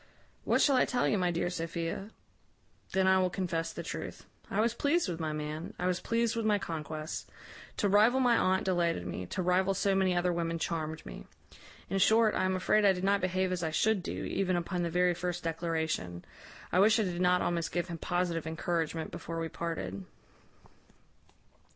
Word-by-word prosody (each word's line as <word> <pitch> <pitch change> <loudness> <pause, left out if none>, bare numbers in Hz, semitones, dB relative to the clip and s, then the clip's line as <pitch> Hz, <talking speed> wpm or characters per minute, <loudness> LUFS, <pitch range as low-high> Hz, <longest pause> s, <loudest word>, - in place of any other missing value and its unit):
What - - +3
shall 280 - +4
I - - +4
tell 245 -1 +1
you, 205 - +1
my 180 -1 +2
dear 175 +1 -1
Sophia? 165 +3 -4 0.8
Then 190 0 +2
I 190 0 +5
will 185 -1 +2
confess 175 -3 -2
the - - -6
truth. - - -6 0.2
I 200 - -1
was 230 +1 +2
pleased 290 +6 +1
with 175 -2 -4
my 160 -1 -2
man. 150 +2 -5
I 180 - -3
was 180 -1 +1
pleased 230 0 0
with 230 - -1
my 210 -1 +3
conquest. 155 -4 -5 0.5
To 205 - +2
rival 215 +6 +5
my 245 -2 +4
aunt 190 -4 +2
delighted 170 - 0
me; 90 +1 -5
to 185 - -3
rival 185 +2 +2
so 195 +1 +1
many 190 -1 +2
other 175 0 +1
women 165 -1 -1
charmed 160 -1 -3
me. - - -9 0.6
In 195 - -1
short, 220 +2 +5
I 185 - +1
am 185 0 +1
afraid 210 +3 +2
I 200 -1 +6
did 180 0 -5
not 200 +1 +2
behave 185 0 0
as 180 -2 -1
I 160 - -1
should 210 +5 +2
do, - - -4
even 185 -2 0
upon 175 +1 -2
the 170 - 0
very 180 +1 +2
first 175 0 -3
declaration 160 - -2 0.5
I 180 - +3
wish 215 +3 +5
I - - +3
did 180 -2 -2
not 180 0 +3
almost 170 -1 -1
give 175 0 -1
him 170 -2 -6
positive 175 -2 -1
encouragement 160 0 -2
before 165 0 -5
we 165 0 -3
parted. 160 - -4
180 Hz, 200 wpm, -31 LUFS, 165-195 Hz, 0.8 s, I